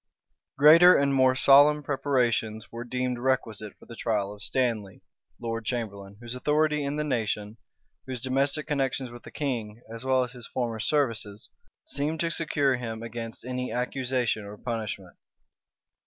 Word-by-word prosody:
Greater 165 Hz, +5 st, +8 dB
and 140 Hz, 0 st, +2 dB
more 130 Hz, -1 st, +4 dB
solemn 145 Hz, +3 st, +6 dB
preparations 120 Hz, -6 st, 0 dB
were 115 Hz, +1 st, -6 dB
deemed 125 Hz, 0 st, -2 dB
requisite 115 Hz, -5 st, -1 dB
for -, -, -17 dB
the 115 Hz, -, -10 dB
trial 105 Hz, -3 st, -1 dB
of 105 Hz, -, -14 dB
Stanley, 115 Hz, -7 st, -2 dB, 0.4 s
lord 115 Hz, -1 st, -3 dB
chamberlain, 100 Hz, -4 st, -4 dB
whose 120 Hz, 0 st, -6 dB
authority 150 Hz, +3 st, +1 dB
in 140 Hz, +1 st, -2 dB
the 150 Hz, -, -1 dB
nation, 110 Hz, -5 st, -2 dB, 0.5 s
whose 130 Hz, -2 st, -4 dB
domestic 135 Hz, +4 st, 0 dB
connections 135 Hz, -4 st, -1 dB
with 120 Hz, 0 st, -11 dB
the -, -, -11 dB
king, 120 Hz, -6 st, -4 dB
as 115 Hz, +1 st, -7 dB
well 130 Hz, -1 st, +3 dB
as 125 Hz, -, -6 dB
his 125 Hz, -2 st, -10 dB
former 115 Hz, -3 st, -3 dB
services, 115 Hz, -5 st, -1 dB, 0.3 s
seemed 150 Hz, +3 st, -2 dB
to 170 Hz, +1 st, 0 dB
secure 145 Hz, -5 st, +1 dB
him 115 Hz, -2 st, -5 dB
against 115 Hz, 0 st, -7 dB
any 125 Hz, 0 st, -3 dB
accusation 125 Hz, -2 st, -1 dB
or 100 Hz, +1 st, -9 dB
punishment. 105 Hz, -6 st, -5 dB
125 Hz, 155 wpm, -27 LUFS, 115-140 Hz, 0.5 s, Greater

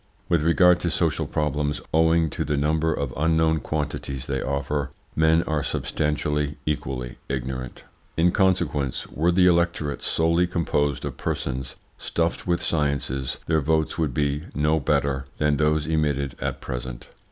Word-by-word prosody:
With 85 Hz, -3 st, +3 dB
regard 90 Hz, +2 st, +5 dB
to 90 Hz, -, 0 dB
social 80 Hz, -1 st, 0 dB
problems, 75 Hz, -1 st, -1 dB
owing 80 Hz, 0 st, +3 dB
to -, -, -2 dB
the 75 Hz, 0 st, -1 dB
number 80 Hz, +2 st, +1 dB
of 70 Hz, -4 st, -2 dB
unknown 80 Hz, +1 st, +2 dB
quantities 70 Hz, -4 st, -3 dB
they 65 Hz, -1 st, -2 dB
offer, 70 Hz, +1 st, -1 dB, 0.3 s
men 80 Hz, +1 st, +4 dB
are 80 Hz, -1 st, -1 dB
substantially, 75 Hz, 0 st, -1 dB
equally 65 Hz, -4 st, -3 dB
ignorant. 65 Hz, -1 st, -4 dB, 0.3 s
In 85 Hz, +2 st, +4 dB
consequence, 85 Hz, -9 st, +1 dB
were 85 Hz, +3 st, +1 dB
the 90 Hz, +1 st, +4 dB
electorate 85 Hz, -4 st, +2 dB
solely 85 Hz, +2 st, +2 dB
composed 75 Hz, -5 st, 0 dB
of -, -, -5 dB
persons 65 Hz, -1 st, -3 dB, 0.2 s
stuffed 85 Hz, +1 st, -1 dB
with 85 Hz, 0 st, +1 dB
sciences 70 Hz, -4 st, -1 dB
their 80 Hz, -1 st, +2 dB
votes 80 Hz, +2 st, 0 dB
would 75 Hz, -6 st, 0 dB
be 75 Hz, +2 st, 0 dB
no 75 Hz, +2 st, +2 dB
better 70 Hz, -1 st, 0 dB
than 75 Hz, -1 st, +2 dB
those 75 Hz, 0 st, +2 dB
emitted 75 Hz, -3 st, 0 dB
at -, -, -3 dB
present. 60 Hz, -1 st, -6 dB
75 Hz, 145 wpm, -24 LUFS, 70-80 Hz, 0.3 s, regard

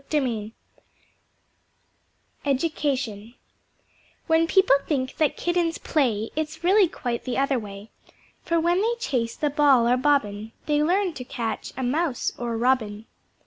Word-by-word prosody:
Education 265 Hz, -6 st, -1 dB, 0.9 s
When 325 Hz, 0 st, +3 dB
People 380 Hz, -6 st, +5 dB
think 260 Hz, -4 st, -2 dB
that 310 Hz, -2 st, +1 dB
Kittens 345 Hz, -1 st, 0 dB
play, 225 Hz, -8 st, 0 dB
It's 315 Hz, +1 st, -4 dB
really 385 Hz, +2 st, +5 dB
quite 245 Hz, -6 st, -4 dB
the 255 Hz, -, -3 dB
other 275 Hz, -1 st, +1 dB
way. 205 Hz, 0 st, -10 dB, 0.5 s
For 335 Hz, -1 st, 0 dB
when 345 Hz, +3 st, +2 dB
they 465 Hz, +3 st, +1 dB
chase 235 Hz, -, -1 dB
the 295 Hz, -1 st, -1 dB
Ball 275 Hz, -5 st, +4 dB
or 245 Hz, +1 st, +3 dB
Bobbin 225 Hz, -6 st, 0 dB
They 295 Hz, -1 st, +2 dB
learn 365 Hz, +3 st, +1 dB
to 265 Hz, -, -7 dB
catch 230 Hz, -3 st, -4 dB
a 260 Hz, -, -2 dB
Mouse 280 Hz, +1 st, 0 dB
or 235 Hz, -1 st, -2 dB
Robin. 225 Hz, -3 st, 0 dB
275 Hz, 130 wpm, -24 LUFS, 235-320 Hz, 0.9 s, People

